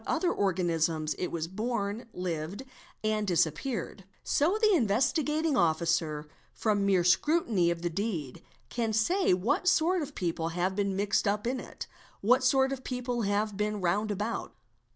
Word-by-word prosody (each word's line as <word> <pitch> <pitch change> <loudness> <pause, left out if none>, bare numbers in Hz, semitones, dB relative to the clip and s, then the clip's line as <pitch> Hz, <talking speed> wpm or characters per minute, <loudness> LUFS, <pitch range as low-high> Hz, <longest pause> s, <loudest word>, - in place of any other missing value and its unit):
other 345 +2 +1
organisms 165 -5 0
it 180 - -1
was 165 -1 -3
born, 215 +2 -3
lived, 180 +4 -4 0.4
and 215 -1 0
disappeared; 180 - -1 0.2
so 340 +9 +2
the 430 -2 +4
Investigating 300 - +1
Officer 160 -4 +1 0.3
from 205 -2 +1
mere 190 -3 +3
scrutiny 205 - +3
of 170 0 -3
the 175 - 0
deed, 170 - -3 0.3
can 230 -2 -1
say 350 - +2
what 255 - +1
sort 360 0 +3
of 290 -1 -6
people 165 -2 -2
have 185 +2 0
been 200 -1 0
mixed 205 +2 +1
up 210 +2 0
in 255 +2 -1
it, - - -8 0.4
what 250 +6 +4
sort 265 +1 +3
of 260 -1 -7
people 250 -1 -3
have 205 0 0
been 210 +1 -1
round 200 +4 0
about. 210 +3 -3
205 Hz, 150 wpm, -29 LUFS, 175-250 Hz, 0.4 s, the